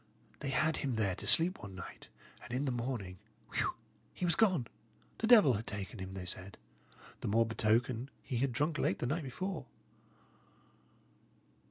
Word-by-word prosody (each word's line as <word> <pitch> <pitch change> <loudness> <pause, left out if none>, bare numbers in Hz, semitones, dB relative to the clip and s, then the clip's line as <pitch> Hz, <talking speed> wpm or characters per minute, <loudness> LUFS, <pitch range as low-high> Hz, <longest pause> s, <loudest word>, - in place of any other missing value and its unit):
"They 140 - -3
had 155 +4 +2
him 135 -4 -1
there 105 -4 +1
to - - -6
sleep 175 +3 +4
one 100 -2 -8
night, 90 - -9 0.3
and - - -11
in 130 +4 0
the 135 - +1
morning 115 -7 -3 0.3
whew! - - 0 0.4
he 180 - -1
was 170 - +3
gone. 185 - +3 0.5
The 225 - +1
devil 215 - +8
had 110 +1 -3
taken 100 +1 -5
him, 95 0 -6
they 95 -1 -5
said; 90 +2 -4 0.6
the - - -4
more 115 +3 +4
betoken, 115 +3 +1
he 125 - -3
had 135 +2 +1
drunk 150 +6 0
late 95 - +1
the - - -2
night 150 +7 0
before." 155 +2 -4
125 Hz, 170 wpm, -34 LUFS, 105-150 Hz, 0.6 s, devil